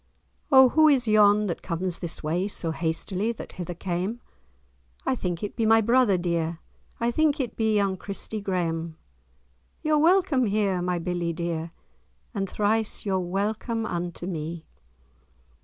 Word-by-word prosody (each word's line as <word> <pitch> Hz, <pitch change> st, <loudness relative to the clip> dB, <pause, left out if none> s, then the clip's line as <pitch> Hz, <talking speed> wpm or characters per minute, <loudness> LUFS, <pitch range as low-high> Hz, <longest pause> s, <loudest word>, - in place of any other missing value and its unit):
"O 265 Hz, -2 st, +8 dB
who 310 Hz, +4 st, +5 dB
is 265 Hz, -5 st, +3 dB
yon, 210 Hz, -1 st, +5 dB
that 175 Hz, -4 st, -3 dB
comes 175 Hz, 0 st, -3 dB
this 170 Hz, -2 st, -5 dB
way, 170 Hz, +5 st, 0 dB
So 170 Hz, -5 st, -1 dB
hastily 175 Hz, +6 st, -1 dB
that -, -, -9 dB
hither 175 Hz, -1 st, -6 dB
came? 185 Hz, +6 st, -3 dB, 0.9 s
I -, -, +2 dB
think 180 Hz, -7 st, -3 dB
it 205 Hz, -, -4 dB
be 230 Hz, -, -1 dB
my 225 Hz, 0 st, +5 dB
brother 230 Hz, -3 st, +3 dB
dear, 170 Hz, -2 st, -1 dB, 0.4 s
I 235 Hz, 0 st, +1 dB
think 310 Hz, +2 st, +2 dB
it 245 Hz, -5 st, -3 dB
be 220 Hz, -1 st, +1 dB
young 200 Hz, -2 st, +1 dB
Christie 205 Hz, +3 st, -4 dB
Graeme. 165 Hz, -4 st, -2 dB, 0.9 s
Your 305 Hz, -1 st, +3 dB
welcome 330 Hz, -, +3 dB
here, 200 Hz, -3 st, +1 dB
my 180 Hz, 0 st, -1 dB
billie 175 Hz, 0 st, -2 dB
dear, 170 Hz, -1 st, -3 dB, 0.6 s
And 195 Hz, -3 st, -2 dB
thrice 215 Hz, +1 st, 0 dB
you're 190 Hz, -2 st, +1 dB
welcome 210 Hz, +5 st, -2 dB
unto 175 Hz, -3 st, -4 dB
me." 165 Hz, -2 st, -5 dB
195 Hz, 150 wpm, -26 LUFS, 175-225 Hz, 0.9 s, O